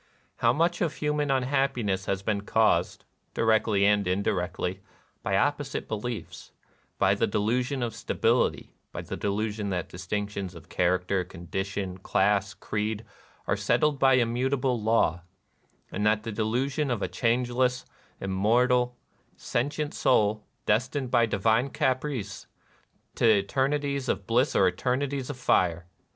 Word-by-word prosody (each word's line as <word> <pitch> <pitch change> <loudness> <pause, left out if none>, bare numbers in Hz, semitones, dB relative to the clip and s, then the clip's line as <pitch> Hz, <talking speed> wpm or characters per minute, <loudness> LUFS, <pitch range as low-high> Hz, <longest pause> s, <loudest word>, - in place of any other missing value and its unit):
How 115 - +3
much 170 +6 +1
of 160 -3 0
human 150 -1 -1
unhappi 135 -1 +1
ness 95 -1 -1
has 95 0 -1
been 100 -1 0
caused, 110 +1 +1 0.3
directly 110 -3 +3
and 105 -1 +3
indirectly, 90 -1 -1 0.4
by - - 0
opposite - - -1
beliefs, 110 +2 -5 0.2
— - - -37
by - - +3
the - - +1
delusion 125 +5 0
of 115 -2 -2
sta - - -5
bility, - - +1
— - - -48
by - - -5
the - - -5
delusion 105 0 -2
that 90 -3 -3
distinctions 100 +1 -4
of 85 - -13
character, 90 +1 +1
condition, 95 +2 -5
class, 100 +1 +1
creed, 105 +2 -3 0.4
are - - +1
settled 150 -2 +1
by 135 -1 +5
immutable 125 +1 +1
law, 105 -6 +2 0.3
— - - -39
and 105 - -2
the 110 +1 +1
delusion 125 +7 -1
of 120 -4 -1
a - - 0
changeless, 125 +5 0 0.3
immortal, 120 +6 +2 0.4
sentient 145 +5 -2
soul, 105 -5 +2 0.2
destined, 125 +4 0
by 120 -2 +4
divine 110 +5 +2
caprice, 130 -6 -2 0.7
to - - -4
eternities 135 +6 +1
of - - -1
bliss 125 +5 +2
or 95 - +5
eternities 130 +8 -1
of 145 - -5
fire 85 -8 +1
110 Hz, 140 wpm, -27 LUFS, 100-130 Hz, 0.7 s, by